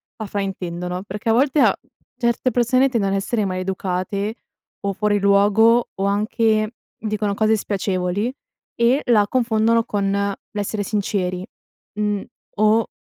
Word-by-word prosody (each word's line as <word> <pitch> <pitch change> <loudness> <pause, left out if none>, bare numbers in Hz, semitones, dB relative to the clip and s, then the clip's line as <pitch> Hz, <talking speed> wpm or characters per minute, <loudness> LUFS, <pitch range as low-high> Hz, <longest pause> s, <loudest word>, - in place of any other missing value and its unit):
la 220 - -6
fraintendono, 180 -2 -4
perché 205 +2 -7
a 225 - +5
volte 275 +4 +3
a - - +5 0.4
certe 235 +1 +1
persone 255 +3 +3
tendono 215 -6 0
a - - +2
essere 210 +2 -1
maleducate 190 +2 -2 0.5
o 200 0 -2
fuori 205 +1 +1
luogo, 205 +4 +4
o 195 - -2
anche 215 +2 +1 0.3
dicono 210 -2 -2
cose 220 +1 +2
spiacevoli 195 +3 -1 0.4
e 245 +4 +3
la 215 -4 +5
confondono 230 -1 +2
con 200 -3 -1 0.4
l'essere 205 0 -2
sinceri, 190 -3 -2 0.5
mhmm, 205 -1 0 0.4
o 215 +1 +4
210 Hz, 130 wpm, -21 LUFS, 195-225 Hz, 0.5 s, a